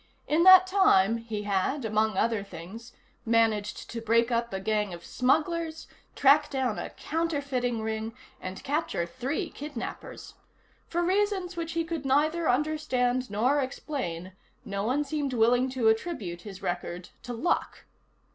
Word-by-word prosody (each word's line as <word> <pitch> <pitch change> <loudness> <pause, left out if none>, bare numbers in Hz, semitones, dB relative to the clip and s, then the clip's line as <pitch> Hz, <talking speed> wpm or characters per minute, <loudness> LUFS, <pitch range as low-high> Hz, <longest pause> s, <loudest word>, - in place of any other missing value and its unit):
In 310 +3 +2
that 375 0 +10
time, 230 - +4
he 225 -2 -5
had, 205 +7 0
among 215 -1 +1
other 225 -2 +1
things, 200 +6 -10 0.3
managed 225 -2 +1
to 230 - -5
break 230 +2 +2
up 235 0 0
a 190 - -3
gang 210 -2 -1
of 170 - -13
smugglers, 320 +5 0 0.3
track 285 +2 +5
down 260 -5 -1
a - - -5
counterfeiting 280 -8 -2
ring, 220 0 -3 0.3
and 185 +1 -7
capture 290 - -1
three 260 - -3
kidnappers. 285 -5 -7 0.5
For 345 +1 -1
reasons 380 -1 0
which 330 -1 -4
he 335 0 0
could 325 -3 -4
neither 310 +5 +2
understand 255 -3 0
nor 245 +8 +2
explain, 255 - -4 0.3
no 200 -2 -3
one 260 +7 +1
seemed 285 -2 -2
willing 245 +2 +3
to 255 -3 0
attribute 220 - -1
his 195 -1 -10
record 175 0 -4
to 245 - -6
luck. 275 +10 -1
245 Hz, 145 wpm, -28 LUFS, 215-300 Hz, 0.5 s, that